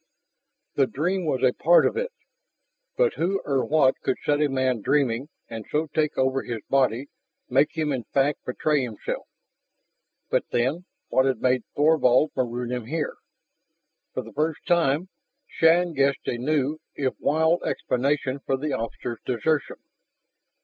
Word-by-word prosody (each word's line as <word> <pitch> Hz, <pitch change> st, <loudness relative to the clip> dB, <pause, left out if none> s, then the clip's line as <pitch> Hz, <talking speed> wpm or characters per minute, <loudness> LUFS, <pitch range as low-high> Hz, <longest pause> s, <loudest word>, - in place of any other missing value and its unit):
The 135 Hz, -2 st, +2 dB
dream 175 Hz, +6 st, -1 dB
was 130 Hz, -3 st, 0 dB
a 125 Hz, -1 st, +4 dB
part 170 Hz, +2 st, +5 dB
of -, -, +1 dB
it. 485 Hz, +1 st, -2 dB, 0.9 s
But 485 Hz, -2 st, +3 dB
who 195 Hz, +4 st, 0 dB
or 135 Hz, -2 st, +1 dB
what 140 Hz, -4 st, +3 dB
could -, -, 0 dB
set 145 Hz, 0 st, +2 dB
a 150 Hz, -, +4 dB
man 130 Hz, -3 st, 0 dB
dreaming 135 Hz, +1 st, +1 dB, 0.2 s
and 110 Hz, -1 st, -6 dB
so 155 Hz, +1 st, -1 dB
take 155 Hz, -1 st, 0 dB
over 130 Hz, 0 st, +1 dB
his 115 Hz, -3 st, -5 dB
body, 130 Hz, -1 st, +2 dB, 0.4 s
make 140 Hz, +5 st, +2 dB
him 155 Hz, -2 st, 0 dB
in 125 Hz, -4 st, -3 dB
fact 140 Hz, +5 st, 0 dB
betray 150 Hz, +3 st, 0 dB
himself? 115 Hz, -5 st, -5 dB, 1.0 s
But -, -, +2 dB
then, 135 Hz, +9 st, 0 dB, 0.2 s
what 130 Hz, +1 st, +3 dB
had 130 Hz, -4 st, 0 dB
made 130 Hz, -1 st, +2 dB
Thorvald 150 Hz, -2 st, +4 dB
maroon 125 Hz, -1 st, -2 dB
him 125 Hz, -3 st, -4 dB
here? 155 Hz, +1 st, -3 dB, 1.0 s
For -, -, -2 dB
the -, -, -12 dB
first 155 Hz, +1 st, -2 dB
time, 170 Hz, 0 st, +2 dB, 0.4 s
Shann 170 Hz, +1 st, +3 dB
guessed 140 Hz, -1 st, +1 dB
a 120 Hz, -, -1 dB
new, 150 Hz, +2 st, 0 dB, 0.2 s
if 135 Hz, -2 st, -1 dB
wild, 160 Hz, +3 st, +2 dB
explanation 135 Hz, +1 st, -1 dB
for 135 Hz, -, 0 dB
the 145 Hz, +1 st, -3 dB
officer's 115 Hz, 0 st, -4 dB
desertion. 140 Hz, +5 st, 0 dB
140 Hz, 150 wpm, -25 LUFS, 130-155 Hz, 1.0 s, part